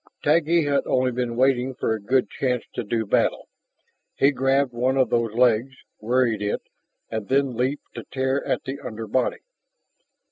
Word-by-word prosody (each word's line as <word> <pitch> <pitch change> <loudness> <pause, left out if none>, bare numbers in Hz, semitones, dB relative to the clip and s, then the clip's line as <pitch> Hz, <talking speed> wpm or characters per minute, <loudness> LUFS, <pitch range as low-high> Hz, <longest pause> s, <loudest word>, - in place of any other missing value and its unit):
Taggi 165 +2 +3
had 140 -1 +2
only 130 0 +2
been 120 -1 -2
waiting 130 0 +2
for 110 - 0
a 110 - -4
good 130 +6 +1
chance 125 -3 -1
to - - -3
do 110 +1 -1
battle. - - +1 0.7
He 140 - +4
grabbed 135 0 +1
one 125 +3 0
of 130 -3 +2
those 115 -2 0
legs, 125 +1 +3 0.2
worried 115 -1 +1
it, 105 0 -2 0.5
and 110 -3 -3
then 135 -1 +1
leaped 130 +5 -2
to - - -7
tear 130 +1 -1
at - - -1
the 135 +1 -5
under 110 -3 -6
body. 125 +4 0
125 Hz, 170 wpm, -24 LUFS, 115-135 Hz, 0.7 s, He